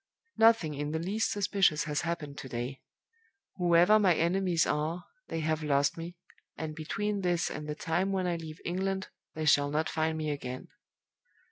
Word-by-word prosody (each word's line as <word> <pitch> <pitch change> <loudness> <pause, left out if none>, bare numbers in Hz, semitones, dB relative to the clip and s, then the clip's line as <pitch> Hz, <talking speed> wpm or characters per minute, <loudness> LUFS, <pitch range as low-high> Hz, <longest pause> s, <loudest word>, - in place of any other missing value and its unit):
"Nothing 225 -9 +5
in 145 +1 -3
the - - 0
least 195 +7 -1
suspicious 195 -6 +2
has 150 -2 -1
happened 160 -4 -4
to 130 - -8
day. 125 +3 -4 0.8
Whoever 175 +4 +5
my 185 -5 +4
enemies 175 0 +2
are, 160 +4 -1 0.2
they 165 - -3
have 155 0 0
lost 140 -1 +2
me, 170 +1 -7 0.4
and 155 -1 -4
between 200 +6 -2
this 175 -2 0
and 150 0 -6
the 150 - -2
time 175 +5 0
when 190 -1 0
I 175 -1 0
leave 160 -2 -8
England 190 +2 -2 0.3
they 155 0 -2
shall 145 -1 +4
not 155 +2 0
find 160 0 0
me 155 -1 -1
again. 130 -3 -6
160 Hz, 170 wpm, -30 LUFS, 150-185 Hz, 0.8 s, Nothing